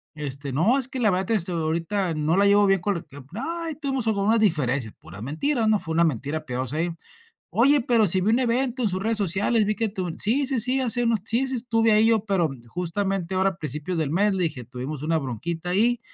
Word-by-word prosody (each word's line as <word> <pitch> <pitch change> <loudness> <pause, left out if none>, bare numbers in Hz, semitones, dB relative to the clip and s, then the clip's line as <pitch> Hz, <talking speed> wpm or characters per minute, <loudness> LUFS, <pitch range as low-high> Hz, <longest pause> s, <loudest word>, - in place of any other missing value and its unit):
Este: 140 -2 -4
"No, 190 - +3
es 255 - +1
que 260 -1 -6
la 220 - +3
verdad, 185 +4 -1
este, 190 -4 +1
ahorita 170 +3 -1
no 155 +4 0
la 200 - +4
llevo 205 0 +5
bien 195 -2 +2
con 200 -1 -1
él. 170 - -9 0.3
Ay, 325 - -4
tuvimos 270 -5 -2
como 215 -3 0
unas 225 +2 +3
diferencias". 140 - +1
Pura 95 +5 -11
mentira, 225 - -1
¿no?, 215 -2 +3
fue 160 -3 -4
una 170 - +4
mentira 150 +2 -2
piadosa 130 +2 -3
ahí. 170 +2 0 0.6
"Oye, 280 +5 +4
pero 230 -3 +3
si 185 +2 +2
vi 205 +4 +1
un 235 - +3
evento 250 +1 0
en 220 - +2
sus 185 0 -1
redes 220 0 +1
sociales, 205 +4 +2
vi 215 - 0
que 225 - 0
tú 185 -5 -4
sí, 265 +7 +1
sí, 260 -3 0
sí, 255 +3 +1
hace 245 -1 +1
unos 230 -3 +1
sí, 240 +4 0
sí, 260 - -2
estuve 225 -1 +1
ahí 215 +1 +5
yo, 220 -2 +2
pero 185 -7 +1 0.2
justamente 190 - -2
ahora 190 +1 +2
a 180 - -10
principios 155 +3 -4
del 150 -3 -1
mes", 200 +5 +2
le 185 -2 0
dije: 140 -7 -4
"Tuvimos 130 +4 -6
una 160 +1 +1
bronquita 160 +7 -4
ahí 230 +6 +2
195 Hz, 235 wpm, -24 LUFS, 160-230 Hz, 0.6 s, llevo